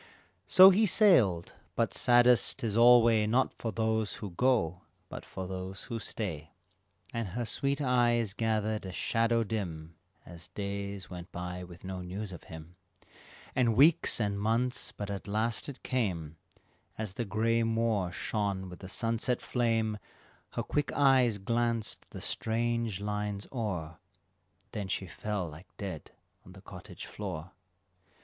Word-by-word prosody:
So 190 +1 +9
he 210 +3 +4
sailed; 125 - +4 0.2
but - - +1
saddest 120 -2 +4
'tis 110 -3 -2
alway 115 -2 +6
Not 125 +4 +2
for 115 - -4
those 110 -1 0
who 100 -3 -7
go, 90 -6 +1 0.3
but - - -7
for 95 -1 -6
those 95 +1 -6
who 115 - -5
stay; 80 -8 -5 0.6
And 115 -2 -2
her 120 +6 -3
sweet 140 +5 -1
eyes 120 -5 +2
gathered 110 -1 0
a - - -5
shadow 115 +4 +1
dim 85 -7 -4 0.3
As 85 -1 -11
days 100 -1 -5
went 90 0 -8
by 90 +1 -5
with 85 -1 -12
no 95 -1 -5
news 95 +3 -5
of 90 - -10
him, 80 +2 -11 0.8
And 120 -3 +3
weeks 150 +3 +5
and 100 -2 0
months, 115 +4 0
but 100 -1 -5
at 100 0 -5
last 110 +6 -1
it 140 - -10
came, 90 -11 -2 0.6
As 110 -4 -4
the 120 - -2
gray 115 +3 +1
moor 115 -5 +1
shone 100 0 -2
with 90 - -10
the 95 - -9
sunset 115 +4 0
flame 115 -3 0 0.5
Her - - -2
quick 150 -1 -1
eyes 130 -6 +4
glanced 115 +2 -1
the - - -9
strange 115 -2 -1
lines 105 -1 -3
o'er, 90 -10 -4 0.7
Then 105 -4 -4
she 95 - -2
fell 95 +2 -3
like 80 +4 -11
dead 95 -6 -6 0.3
on 90 - -14
the 95 - -13
cottage 90 -3 -10
floor. 80 +3 -6
105 Hz, 145 wpm, -30 LUFS, 95-115 Hz, 0.8 s, So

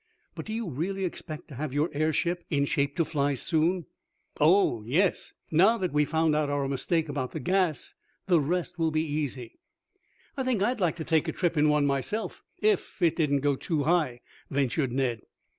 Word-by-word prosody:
But - - -8
do 220 - -4
you 225 -2 -3
really 185 +7 -2
expect 155 -3 -6
to - - -10
have 140 +1 -4
your 150 +3 +1
airship 160 +4 0
in 140 -3 +1
shape 140 0 0
to 165 - +1
fly 145 -2 0
soon?" 165 +5 +1 0.5
"Oh, 155 - +4
yes. 170 - 0 0.2
Now 195 +9 +5
that 185 -7 -2
we 150 0 +3
have - - -14
found 160 -1 +2
out 150 -1 +1
our 145 -1 0
mistake 160 +4 0
about 140 -3 -3
the 160 - -3
gas, 180 +2 0 0.3
the 175 -4 +4
rest 175 +4 -2
will 165 -1 +2
be 155 0 0
easy." 145 -6 -4 0.8
"I 270 - -2
think 245 -6 +1
I'd 245 +2 0
like 175 -4 +1
to 165 - -5
take 160 0 +1
a - - 0
trip 175 0 -1
in 150 0 +4
one 150 -1 +3
myself, 140 - -2 0.2
if 425 - +1
it 170 -3 +3
didn't 145 -4 +1
go 145 0 +2
too 150 +1 -1
high," 150 -7 +1 0.3
ventured 135 -1 0
Ned. 125 -4 -1
155 Hz, 195 wpm, -28 LUFS, 140-175 Hz, 0.8 s, Now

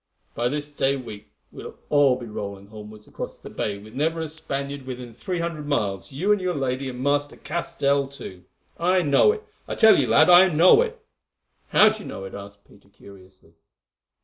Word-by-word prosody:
By 120 +1 -1
this 150 +1 -4
day 140 -1 0
week 110 -5 -9 0.2
we - - -10
will - - -9 0.2
all 145 -3 +4
be 125 -1 -8
rolling 100 -2 -7
homewards 105 0 -12
across - - -7
the - - -12
Bay 100 -1 -3
with 105 +2 -14
never 160 +5 -1
a 160 - -3
Spaniard 140 -3 -5
within 125 -2 -7
three 175 +10 -4
hundred 165 -3 -4
miles, 100 - -2
you 175 +10 0
and 205 -2 +2
your 180 -1 -1
lady 135 -1 -2
and 125 0 -7
Master 145 +1 0
Castell, 140 -5 -1
too. 95 -10 -11 0.4
I 180 +2 +2
know 145 - +4
it! 430 0 -6 0.2
I - - -4
tell 220 -9 +6
you, 125 - -1
lad, 145 +8 +5
I 180 +1 +8
know 175 - +5
it!" 465 -2 -4 0.6
"How 215 - +6
do 215 0 -6
you - - -9
know 95 - -7
it?" 95 - -9
asked 100 0 -11
Peter 100 -1 -22
curiously. 95 -4 -17
140 Hz, 200 wpm, -24 LUFS, 110-165 Hz, 0.6 s, I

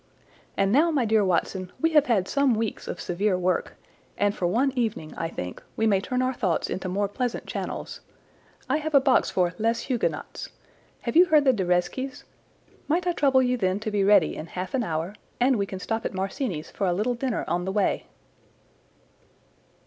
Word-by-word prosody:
And 195 0 +2
now, 300 +8 +4
my 285 -7 +1
dear 220 -1 +3
Watson, 185 0 -1
we 325 +4 +2
have 300 -2 +5
had 200 -6 +2
some 280 -4 +2
weeks 220 -1 -3
of - - -5
severe 185 +2 0
work, 180 0 0 0.4
and 205 0 +1
for 175 - 0
one 255 +9 +2
evening, 220 -10 -2
I 165 - -3
think, 90 - -6 0.2
we 225 - +2
may 200 -3 +3
turn 250 +5 -1
our 255 +1 0
thoughts 185 -9 -1
into 185 0 -3
more 200 +2 0
pleasant 245 +4 -3
channels. - - -5 0.7
I 270 - +2
have 310 -1 -2
a - - +9
box 265 -1 +3
for 180 -1 +1
Les 230 +2 +1
Huguenots. 250 -4 -3 0.5
Have - - -4
you 350 +2 +8
heard 305 -4 +4
the 265 - +5
De 195 -5 -1
Reszkes? 180 +10 -1 0.6
Might 345 +4 +1
I 355 - +2
trouble 270 -5 +3
you 250 0 +1
then 190 -2 0
to 215 - -3
be 205 -1 +1
ready 195 -5 +4
in 160 - -6
half 185 +2 -5
an 265 - +1
hour, 165 0 -3 0.3
and 250 0 +3
we 200 -1 -1
can 190 - -6
stop 225 +4 -3
at - - -4
Marcini's 190 - -3
for 195 - -1
a 175 - +2
little 215 +7 0
dinner 245 0 -2
on 175 +1 -1
the 190 - -2
way?" 205 0 0
215 Hz, 200 wpm, -26 LUFS, 185-260 Hz, 0.7 s, a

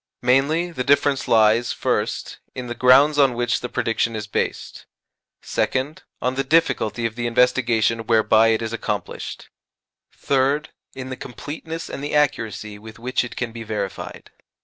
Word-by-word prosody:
Mainly, 145 +8 +2
the 130 -6 -3
difference 140 0 +2
lies, 110 +1 +4
first, - - -2 0.2
in 125 - -5
the 120 - -4
grounds 135 +5 +5
on 135 -3 +4
which 120 0 0
the 125 - -5
prediction 115 0 -1
is 105 -1 -4
based; 105 - -4 0.6
second, 135 +4 -1 0.2
on 125 - 0
the 135 +1 -1
difficulty 130 -7 +1
of 115 - -1
the 120 0 -3
investigation 120 -2 +2
whereby 110 -1 +4
it 115 0 +1
is 110 0 -4
accomplished; 105 -4 -5 0.6
third, 140 +3 0 0.3
in 130 0 -6
the - - -3
completeness 160 +5 -7
and 140 - -6
the 145 - -2
accuracy 110 -7 -1
with 110 +1 -12
which 125 +2 -1
it 125 - -8
can 125 -2 -3
be 115 0 -8
verified. 105 -3 -5
125 Hz, 155 wpm, -22 LUFS, 115-135 Hz, 0.6 s, grounds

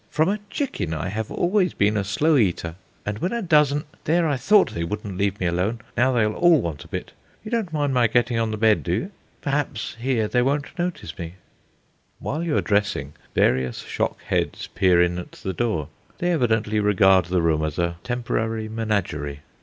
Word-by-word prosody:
From 155 +3 +2
a 210 +2 0
chicken 100 - -2
I 90 +3 -3
have 110 +2 -3
always 185 0 +1
been 105 +2 +2
a 105 - +1
slow 145 +11 +2
eater, 90 - +1 0.3
and 105 +1 -3
when 180 - -1
a 235 -1 -2
dozen 150 -4 +3 0.2
there, 165 +1 +3
I 145 - +1
thought 200 +10 +4
they 85 - -3
wouldn't 105 +2 -4
leave 100 +1 0
me 90 - -1
alone. 90 +7 0 0.2
Now 130 +2 +3
they'll 110 -4 +2
all 175 +1 +5
want 80 - -4
a - - -15
bit. - - -5 0.3
You 215 - -8
don't 225 -7 -1
mind 145 -3 0
my 125 -2 +4
getting 120 +1 +1
on 115 -1 +1
the 110 - -3
bed, 110 -1 +4
do 85 - -3
you? 115 - -2 0.3
Perhaps 140 -6 -2
here 120 -3 +1
they 125 +3 +2
won't 140 +5 -1
notice 175 - -3
me." 85 0 -6 0.8
While 155 +3 -3
you 165 -3 0
are - - +3
dressing 100 -9 0 0.2
various 65 -1 +2
shock - - -2
heads - - -1
peer 90 -2 +4
in 90 0 +2
at 90 - -9
the 95 - -5
door; 110 - -1 0.3
they 175 +1 0
evidently 110 -8 +1
regard 95 -3 +4
the 90 0 0
room 80 -2 +2
as 75 -1 -3
a 85 -1 0
temporary 115 -2 -2
menagerie. 100 -11 -2
110 Hz, 200 wpm, -23 LUFS, 90-145 Hz, 0.8 s, all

